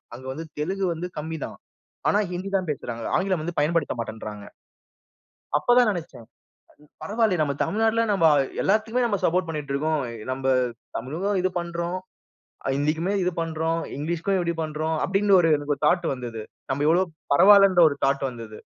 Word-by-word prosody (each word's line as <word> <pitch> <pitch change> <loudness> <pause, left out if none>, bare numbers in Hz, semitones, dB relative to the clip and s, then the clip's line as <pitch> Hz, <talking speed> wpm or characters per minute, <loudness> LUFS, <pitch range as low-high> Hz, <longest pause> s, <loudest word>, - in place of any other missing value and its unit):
அங்க 130 - -11
வந்து 160 +4 -6
தெலுங்கு 190 +4 -1
வந்து 175 +2 -5
கம்மிதான். 160 0 -6 0.5
ஆனா 205 - +3
ஹிந்தி 185 +2 -4
தான் 185 -4 -4
பேசறாங்க. 120 -5 -5
ஆங்கிலம் 185 -3 0
வந்து 175 +1 -5
பயன்படுத்த 155 0 +1
மாட்டேன்றாங்க. 110 -2 -6 1.1
அப்பதான் 245 -1 +4
நெனச்சன். 170 - -5 0.8
பரவாயில்லயே 215 -4 +1
நம்ம 145 -2 +1
தமிழ்நாட்டுல 225 +5 +2
நம்ப 195 -5 +2 0.4
எல்லாத்துக்குமே 220 +5 +1
நம்ம 205 -4 +1
சப்போர்ட் 180 +1 +2
பண்ணிட்டுருக்கோம். 150 0 -1 0.3
நம்ப 135 0 -3 0.5
தமிழுக்கும் 175 - -2
இது 185 - +1
பண்றோம். 170 +1 -3 0.8
ஹிந்திக்குமே 155 +7 0
இது 180 - +1
பண்றோம். 165 0 -1 0.2
இங்லீஷ்க்கும் 170 +6 -1
இப்படி 170 -1 0
பண்றோம். 155 +1 -2
அப்படின்னு 195 0 +3
ஒரு 165 -2 +3
எனக்கு 145 0 -2
தாட்டு 175 +3 +3
வந்தது. 120 -3 -6 0.3
நம்ப 140 +2 -1
எவ்ளோ 175 +3 +4 0.3
பரவால்லன்ற 195 +1 +7
ஒரு 145 - -5
தாட்டு 135 0 +1
வந்தது. 115 -3 -9
165 Hz, 140 wpm, -24 LUFS, 145-190 Hz, 1.1 s, பரவால்லன்ற